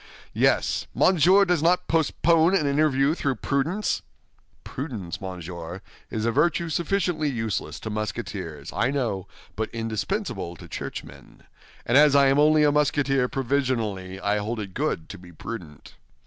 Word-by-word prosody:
"Yes. - - +1
Monsieur 185 +3 +5
does 180 -5 +1
not 175 +3 +2
postpone 165 +2 +3
an 155 - +2
interview 140 0 +2
through 140 -5 -1
prudence?" 150 - -1 0.6
"Prudence, 115 - -6
monsieur, 90 -1 -6 0.3
is 110 0 -2
a 115 - +2
virtue 165 +5 +1
sufficiently 170 -2 0
useless 115 -6 -3
to 110 - -5
Musketeers, 100 -8 -5
I 115 +8 +1
know, 120 -9 -2 0.3
but 110 0 -2
indispensable 115 - -3
to - - -12
churchmen; - - -8 0.4
and 120 +4 +5
as 150 -1 +6
I 140 -1 +6
am 135 +2 +3
only 155 +1 +5
a 145 - +5
Musketeer 140 -3 +2
provisionally, 115 -8 -1
I 100 +1 0
hold 110 +3 -3
it 95 -3 -6
good 130 - -2
to 100 - -8
be 90 -1 -14
prudent. 80 -4 -9
135 Hz, 145 wpm, -25 LUFS, 105-155 Hz, 0.6 s, as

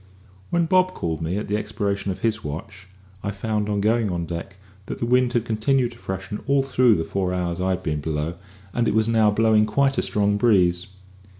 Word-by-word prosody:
When 170 -1 +2
Bob 185 +2 +3
called 80 -1 -3
me 85 +4 -2
at 105 - -3
the 105 - 0
expiration 100 -2 -2
of 95 - -4
his 110 -1 0
watch, 95 +6 -7 0.3
I 100 - -3
found, 105 +1 -2
on 100 -1 0
going 110 +1 +2
on 85 -2 -2
deck, 85 +3 -6 0.3
that - - -4
the - - -2
wind 125 0 +2
had 120 -1 +1
continued 120 +3 +1
to 120 - -15
freshen 95 +1 -5
all 140 0 +3
through 125 -4 +4
the 80 - -1
four 95 +1 -2
hours 90 -1 -2
I 95 - 0
had 95 0 -1
been 75 -4 -2
below, 75 +1 -2 0.4
and 120 -1 +1
it - - +1
was 110 0 +3
now 110 -2 +4
blowing 110 0 +3
quite 135 +5 +2
a - - +2
strong 105 0 +1
breeze. 90 -5 +3
105 Hz, 215 wpm, -23 LUFS, 95-115 Hz, 0.4 s, through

